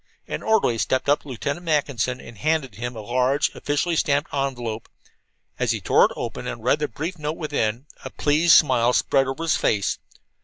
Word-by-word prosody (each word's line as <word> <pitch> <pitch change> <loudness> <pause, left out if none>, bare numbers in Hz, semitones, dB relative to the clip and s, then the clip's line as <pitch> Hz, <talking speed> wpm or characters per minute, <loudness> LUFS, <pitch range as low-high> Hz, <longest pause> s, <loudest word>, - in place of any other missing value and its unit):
An - - -4
orderly 205 - +2
stepped 130 +4 0
up 145 +1 +3
to - - -17
Lieutenant 140 +6 -4
Mackinson 140 -6 0
and 115 -3 -12
handed 155 -3 0
him 120 +1 -5
a 110 - -6
large, 125 +5 +1
officially 145 +4 -1
stamped 145 +1 0
envelope. 120 -5 -3 0.7
As - - +1
he - - -3
tore - - +4
it - - -1
open - - -5
and 115 - -6
read 125 +5 +2
the 150 - -1
brief 160 +8 -5
note 150 +1 -3
within, 130 -6 -2 0.2
a - - -5
pleased 155 +3 +3
smile 125 -5 +5
spread 135 +1 +2
over 135 +5 -4
his 165 - +2
face. 100 -2 0
140 Hz, 190 wpm, -23 LUFS, 120-150 Hz, 0.7 s, smile